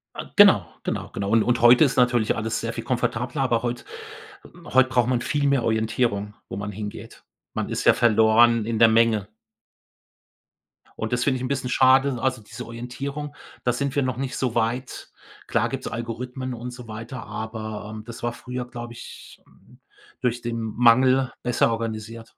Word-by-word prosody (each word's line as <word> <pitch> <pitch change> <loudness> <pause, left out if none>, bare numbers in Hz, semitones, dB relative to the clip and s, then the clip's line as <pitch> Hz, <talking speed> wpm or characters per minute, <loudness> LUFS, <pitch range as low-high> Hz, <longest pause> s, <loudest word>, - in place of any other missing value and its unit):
A - - -6
genau. - - +7 0.2
Genau. - - -3
Genau, 100 0 -3
un 115 -1 +4
und 120 -1 +1
heute 120 +5 +7
ist 135 - -1
natürlich 120 -3 +2
alles 110 0 -2
sehr 115 0 -4
viel - - -5
komfortabler, 125 +2 -1
aber 120 -3 +1
heut 120 0 -3 0.9
heut 130 0 +5
braucht 125 -2 +2
man 125 -1 +1
viel 145 -1 0
mehr 140 -3 +2
Orientierung, 110 -2 0 0.2
wo 95 - -5
man 100 +1 -4
hingeht. 105 +1 -8 0.3
Man - - -3
ist - - -3
ja - - +7
verloren 115 0 +4
in 115 -1 -2
der 115 - +8
Menge. 110 -3 +3 1.7
Und 110 +2 -3
das 120 0 +1
finde 130 -2 +1
ich - - -7
'n - - -1
bisschen 130 -1 -2
schade. 130 +1 +4
Also 130 -3 0
diese 120 +4 -9
Orientierung, 135 +5 -6 0.3
da 125 - +1
sind 140 +3 -2
wir 140 - +2
noch 130 -2 -2
nicht 135 0 -3
so 125 -3 -1
weit. 120 +3 -2 0.4
Klar - - +1
gibt's - - -5
Algorithmen 125 +3 -5
und 125 +1 -6
so 125 -2 -11
weiter, 115 +3 -7
aber, 110 -1 -6
ähm, 110 0 -8
das 115 0 -10
war 120 0 -1
früher, 125 0 -6
glaube 120 -1 -8
ich, 120 - -12
hm, - - -23 0.4
durch 120 -1 -1
den 120 -1 -3
Mangel 125 +3 +3
besser 120 -1 +2
organisiert. 115 0 -5
120 Hz, 180 wpm, -24 LUFS, 110-130 Hz, 1.7 s, der